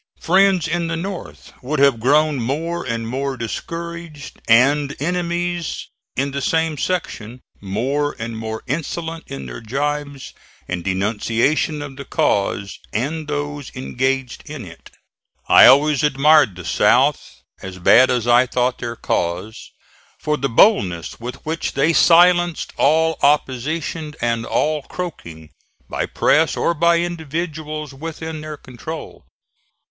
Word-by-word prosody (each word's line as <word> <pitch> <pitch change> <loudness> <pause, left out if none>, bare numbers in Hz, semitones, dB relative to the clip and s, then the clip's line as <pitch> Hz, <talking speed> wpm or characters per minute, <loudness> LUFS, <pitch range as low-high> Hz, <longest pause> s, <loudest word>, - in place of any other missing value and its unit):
Friends 190 -1 +3
in 170 +1 -1
the 165 0 -2
North 190 +2 -7
would 145 +4 -3
have 140 -4 +4
grown 150 +4 +3
more 160 +8 -2
and 115 -2 -3
more 135 +2 -3
discouraged, 165 +4 -7
and 140 +5 +4
enemies 175 +1 -2 0.3
in 140 +1 -1
the 140 0 -3
same 160 +2 0
section 130 -8 -3 0.2
more 135 +9 -2
and 115 0 -5
more 110 0 -5
insolent 160 +4 -4
in 70 -1 -7
their - - -8
gibes 140 +3 -3 0.3
and 90 -1 -4
denunciation 115 - 0
of 135 -2 -9
the 140 - -6
cause 100 0 -1
and 150 +7 -3
those 145 -2 -4
engaged 130 0 -2
in 145 -8 -7
it. 85 -2 -13 0.6
I - - +8
always 145 +1 +5
admired 150 - +4
the 90 -1 -9
South, - - +2 0.2
as 95 -1 -8
bad 120 +8 +6
as 120 -2 0
I 120 +1 +5
thought 125 0 0
their 120 0 -4
cause, 90 +2 -3 0.5
for 150 - -1
the 135 -1 -2
boldness 100 - +3
with 120 +2 -6
which 160 +2 -3
they 150 +4 +2
silenced 175 0 +4
all 160 +2 +2
opposition 150 +2 0
and 115 -1 -1
all 155 0 0
croaking, 85 - -8 0.4
by - - -3
press - - +2
or 170 - +1
by 170 +1 +3
individuals, 155 -3 -4
within 160 +2 -6
their 155 -1 -7
control. 145 +6 -9
145 Hz, 130 wpm, -20 LUFS, 120-160 Hz, 0.6 s, I